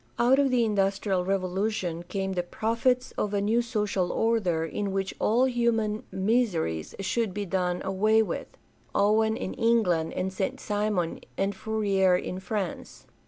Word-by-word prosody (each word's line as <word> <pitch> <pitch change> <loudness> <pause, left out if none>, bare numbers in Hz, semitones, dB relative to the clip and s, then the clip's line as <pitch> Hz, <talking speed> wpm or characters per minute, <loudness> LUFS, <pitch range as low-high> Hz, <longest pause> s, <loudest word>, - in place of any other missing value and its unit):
Out 255 +3 +4
of 280 -1 +3
the 245 -2 +3
Industrial 195 -2 +1
Revolution 190 -1 -1
came 190 +2 -3
the 180 - 0
prophets 230 +7 0
of 210 0 -1
a - - +2
new 220 +4 +2
social 210 -6 -1
order 195 -8 +1
in 200 +4 -3
which 195 0 -2
all 240 +4 +3
human 230 -4 +1
miseries 190 - 0
should 210 -1 -1
be 205 -1 -2
done 180 -1 -1
away 215 +3 +3
with - - -4 0.3
— - - -33
Owen 220 +2 +3
in - - -4
England 220 -9 +2
and 185 +1 -2
St. 190 0 -2
Simon 205 -5 -1 0.2
and 195 +1 0
Fourier 195 -4 +2
in 180 +1 -4
France. 190 -1 -5
205 Hz, 155 wpm, -27 LUFS, 185-225 Hz, 0.3 s, Out